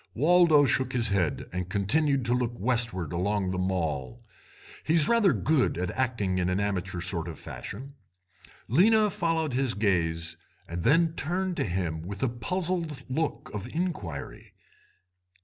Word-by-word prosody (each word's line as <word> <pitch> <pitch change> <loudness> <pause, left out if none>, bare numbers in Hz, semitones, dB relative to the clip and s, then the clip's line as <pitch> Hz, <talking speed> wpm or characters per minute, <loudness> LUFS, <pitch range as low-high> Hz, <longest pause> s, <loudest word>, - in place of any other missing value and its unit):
"Waldo 160 +1 +5
shook 130 0 0
his 120 -3 +2
head, 95 -6 0
and 90 0 -3
continued 130 +7 +1
to 120 - +1
look 125 -1 0
westward 115 - -1
along 95 +2 0
the 90 - -2
Mall. 90 - -2 0.6
He's 155 -1 +3
rather 230 -5 +4
good 130 - +1
at 90 0 -2
acting 115 -8 -1
in 90 0 0
an 90 +2 0
amateur 95 -3 -2
sort 85 -1 -2
of 85 - -7
fashion. 135 +7 -8 0.7
Lena 210 - +4
followed 160 -5 0
his 130 -1 0
gaze, 85 -5 0 0.3
and 85 +1 -4
then 165 - +3
turned 180 +4 -1
to 140 - 0
him 85 -4 -2
with 100 +7 -6
a 130 - +2
puzzled 165 +3 -2
look 155 +3 -2
of 105 +1 -5
inquiry. 155 - -5
115 Hz, 150 wpm, -28 LUFS, 90-155 Hz, 0.7 s, Waldo